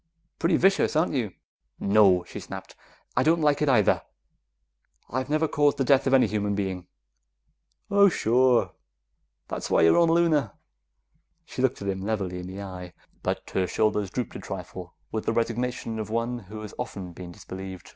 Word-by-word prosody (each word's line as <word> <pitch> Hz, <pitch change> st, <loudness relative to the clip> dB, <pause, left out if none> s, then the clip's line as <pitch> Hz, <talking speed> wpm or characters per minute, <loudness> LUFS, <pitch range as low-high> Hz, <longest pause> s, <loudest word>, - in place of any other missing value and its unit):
"Pretty 170 Hz, 0 st, +3 dB
vicious, 195 Hz, -3 st, +3 dB
aren't 155 Hz, +2 st, +2 dB
you?" 120 Hz, -7 st, 0 dB, 0.5 s
"No!" 100 Hz, -3 st, +4 dB
she -, -, -8 dB
snapped. -, -, -9 dB, 0.4 s
"I 125 Hz, -, +3 dB
don't 165 Hz, +5 st, +3 dB
like 150 Hz, -1 st, +2 dB
it 150 Hz, -, +2 dB
either; 110 Hz, -6 st, +4 dB, 1.1 s
I've 130 Hz, +1 st, -2 dB
never 155 Hz, +2 st, +2 dB
caused 145 Hz, -1 st, +2 dB
the 135 Hz, -, +1 dB
death 135 Hz, +1 st, +3 dB
of 135 Hz, -, +2 dB
any 130 Hz, -, +5 dB
human 105 Hz, -1 st, -1 dB
being." 95 Hz, -3 st, -3 dB, 1.0 s
"Oh, 200 Hz, 0 st, +6 dB
sure. 125 Hz, -3 st, +3 dB, 0.8 s
That's -, -, -5 dB
why -, -, +3 dB
you 80 Hz, -, +6 dB
were -, -, +4 dB
on 170 Hz, -1 st, +4 dB
Luna!" 160 Hz, -9 st, +2 dB, 0.9 s
She -, -, -5 dB
looked 130 Hz, -5 st, 0 dB
at -, -, -4 dB
him 95 Hz, -1 st, -2 dB
levelly 95 Hz, -3 st, -2 dB
in 90 Hz, -, -7 dB
the 95 Hz, +2 st, -7 dB
eye, 90 Hz, -2 st, -8 dB, 0.3 s
but -, -, -3 dB
her 95 Hz, -1 st, 0 dB
shoulders 105 Hz, -2 st, 0 dB
drooped 125 Hz, +4 st, -4 dB
a -, -, -5 dB
trifle 90 Hz, -1 st, -8 dB, 0.2 s
with 110 Hz, -, -4 dB
the -, -, +2 dB
resignation 115 Hz, 0 st, -2 dB
of 110 Hz, -, -4 dB
one 115 Hz, +2 st, -1 dB
who 105 Hz, +1 st, -9 dB
has 105 Hz, -, -8 dB
often 90 Hz, -3 st, -5 dB
been 90 Hz, +1 st, -9 dB
disbelieved. 95 Hz, +1 st, -9 dB
110 Hz, 175 wpm, -26 LUFS, 95-135 Hz, 1.1 s, Oh